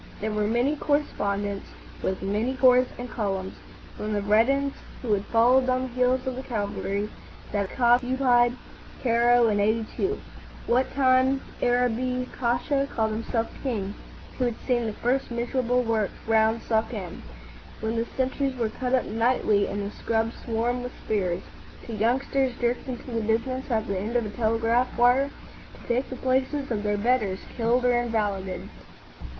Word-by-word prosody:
There 215 +1 -2
were 210 0 0
many 240 +7 +2
correspondents 205 -10 -1 0.3
with 190 0 -2
many 215 +7 0
corps 255 0 +6
and 245 - -5
columns,—from 205 0 -5
the 205 - 0
veterans 260 +7 +3 0.3
who 225 -4 +1
had 200 -1 0
followed 250 +3 +4
on 255 0 +1
the - - -2
heels 250 +1 +1
of 260 -1 -2
the 260 - -4
cavalry 205 -4 -2 0.4
that 200 +3 -2
occupied 245 0 +4 0.5
Cairo 240 0 +4
in 205 -1 +1
'82, 225 - 0 0.5
what 250 +2 +2
time 260 0 +4 0.2
Arabi 250 +1 +1
Pasha 260 +3 +1
called 220 -1 0
himself 225 +1 -1
king, 205 -7 -2 0.5
who 255 - +2
had 240 -2 -1
seen 240 -3 +1
the 215 - -3
first 255 +5 0
miserable 245 +1 0
work 225 -3 +1 0.2
round 225 0 +3
Suakin 220 -5 -2 0.6
when 220 +1 -2
the 230 +1 -1
sentries 265 +1 0
were 230 -3 0
cut 250 +3 -1
up 255 - +1
nightly 220 -2 +2
and 205 0 -3
the 200 - -6
scrub 225 0 0
swarmed 240 +2 -1
with 250 0 -6
spears, 185 -4 0 0.4
to 235 - -6
youngsters 255 +4 +1
jerked 240 +1 0
into 255 0 -6
the 230 -1 -1
business 235 +5 -1
at 225 -2 +1
the 195 -4 -2
end 215 +5 -4
of 240 -2 +2
a - - -4
telegraph 230 +2 +1
wire 250 +3 +4 0.5
to - - -15
take 245 +3 0
the 260 - -5
places 260 +2 0
of 210 -3 0
their 205 0 0
betters 210 -4 +1
killed 240 +2 +2
or 250 - +5
invalided. 210 -6 -1
235 Hz, 155 wpm, -26 LUFS, 215-255 Hz, 0.6 s, corps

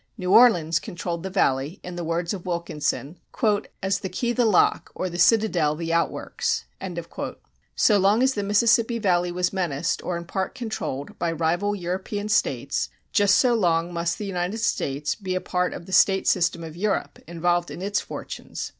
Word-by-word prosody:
New 185 -3 -2
Orleans 170 -10 +6
controlled 175 -4 -5
the 190 - -4
Valley, 145 -3 0
in 180 0 -7
the 175 - -4
words 170 +2 -1
of 185 -4 -6
Wilkinson, 170 -2 -2 0.6
"as 195 0 +1
the 190 - -4
key 240 +6 -1
the 245 -1 +2
lock, 210 -5 +3
or 185 - -3
the 175 - -5
citadel 180 -7 +3
the 165 +1 -3
outworks." 170 0 -1 1.1
So 210 - +4
long 205 +5 +4
as 265 0 +3
the 205 - -2
Mississippi 230 +3 +3
Valley 180 -5 +1
was 180 +1 -1
menaced, 170 -7 -1
or 180 -1 -2
in 170 - -7
part 190 +5 -3
controlled, 215 - -5
by 170 -1 0
rival 170 +6 0
European 190 +3 -4
states, - - 0 0.2
just 205 -1 +4
so 250 -2 +4
long 175 -5 +1
must 170 0 -1
the 210 - -5
United 190 +3 -2
States 145 -9 -1
be 190 -4 -4
a - - +1
part 180 0 -1
of - - -8
the 190 - -8
state 195 0 +4
system 170 -2 +2
of 160 -1 -8
Europe, 205 +3 -2
involved 175 +1 0
in 180 - -7
its 200 +1 0
fortunes. - - -7
180 Hz, 180 wpm, -24 LUFS, 170-205 Hz, 1.1 s, Orleans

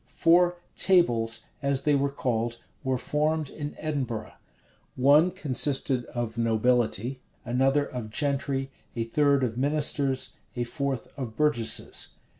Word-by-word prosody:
Four 175 +1 +3 0.2
"tables," 115 -12 +3 0.2
as 140 -1 0
they 150 - +3
were 140 0 +2
called, 120 -4 -2 0.3
were 130 -1 0
formed 150 +2 -1
in 145 -1 -6
Edinburgh. 130 -8 -3 0.6
One 145 +7 +5
consisted 140 -5 +1
of 120 -2 -4
nobility, 115 +1 +1 0.3
another 135 +4 +2
of 120 -5 -6
gentry, 135 +1 -1 0.2
a 115 - -1
third 140 +3 +2
of 120 -1 -2
ministers, 140 -1 +1 0.2
a 120 - -1
fourth 135 -1 -3
of 120 -5 -5
burgesses. 145 -6 +1
135 Hz, 120 wpm, -27 LUFS, 120-145 Hz, 0.6 s, One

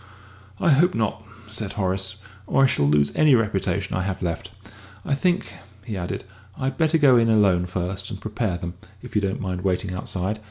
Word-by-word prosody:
"I 170 - +3
hope 175 +6 +4
not," 110 -1 -1 0.2
said 110 -1 -3
Horace, 95 -1 -1 0.3
"or 135 - +3
I - - +8
shall 75 - +2
lose 70 -1 +3
any 150 -4 +6
reputation 115 -3 0
I 95 - 0
have 95 0 -3
left. 85 -2 -3 0.6
I - - 0
think," 175 +6 0 0.3
he 110 -4 -4
added, 90 -2 -4 0.3
"I'd 135 0 -2
better 160 0 +3
go 140 -5 +6
in 115 -1 +3
alone 95 -5 +4
first 95 +2 -3
and 100 -3 -6
prepare 105 -4 -2
them, 85 0 -5 0.3
if - - -10
you 105 - +3
don't 95 -1 -1
mind 90 -2 -3
waiting 95 0 -1
outside. 95 +3 -2
100 Hz, 190 wpm, -24 LUFS, 90-120 Hz, 0.6 s, I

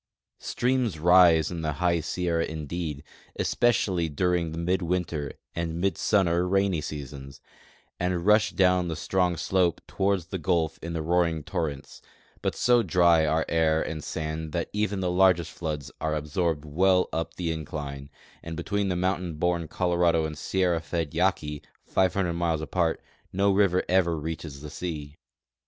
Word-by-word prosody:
Streams 125 -7 0
rise 85 -1 +5
in 85 -2 -4
the 80 -1 -1
high 85 +3 +1
Sierra 85 +1 -1
indeed, 80 -1 -4 0.4
espe 120 - +2
cially 90 -8 0
during 90 -1 +1
the 80 - -6
midwinter 85 -4 -1 0.2
and 85 -1 -3
midsummer 90 -2 +2
rainy 95 -3 +1
seasons, 70 -2 -7 0.6
and 90 -1 -1
rush 105 0 +5
down 90 -1 +2
the 80 - -3
strong 90 +1 0
slope 90 +1 +1
toward 95 -1 0
the 85 +3 -6
gulf 80 -2 0
in 85 0 -4
roaring 85 -1 +1
torrents; 75 -5 -4 0.4
but - - -1
so 120 -1 +4
diy 85 -6 +3
are 80 0 +1
air 80 -1 +2
and 80 -2 -4
sand 80 0 -4
that 85 -2 -2
even 105 -2 -1
the 90 -1 0
largest 90 -3 +3
floods 75 -4 -5
are 80 -1 0
ab 75 -1 -3
sorbed 80 -1 -1
well 90 +5 +3
up 80 0 -3
the 85 -2 -2
incline 75 -3 -6 0.2
— - - -27
and 80 -1 -6
between 100 +3 -1
mountain 90 -2 -1
born 85 0 0
Colo 90 +2 -1
rado 85 -2 +3
and 80 -1 -4
sierra 90 0 0
fed 85 -2 -3
Yaki, 80 -4 0 0.2
500 95 -1 +1
miles 85 -2 0
apart, 80 +2 -1 0.3
no 100 +2 +2
river 95 -2 +3
ever 85 -3 +2
reaches 75 -2 -6
the 75 0 -8
sea. 75 -4 -6
85 Hz, 155 wpm, -27 LUFS, 80-90 Hz, 0.6 s, rise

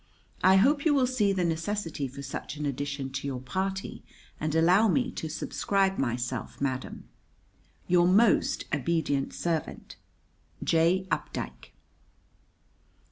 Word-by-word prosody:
I 190 +1 +7
hope 280 +9 +4
you 310 -3 +3
will 265 -2 +4
see 245 -6 +1
the 185 -2 0
necessity 165 -3 -2
for 135 +2 -9
such 140 - -6
an 150 - -3
addition 140 0 -3
to 135 +1 -4
your 130 -2 -3
party, 190 +9 -4 0.4
and 155 0 -2
allow 180 +7 +5
me 250 +5 +1
to 160 - -5
subscribe 195 +4 0
myself, 120 -2 -3
madam, 130 -2 -3 0.8
Your 175 0 +4
most 205 +4 +3
obedient 145 -2 0
servant, 165 -3 -3 0.7
J. 170 +3 +2
UPDIKE. - - -4
165 Hz, 125 wpm, -28 LUFS, 140-195 Hz, 0.8 s, I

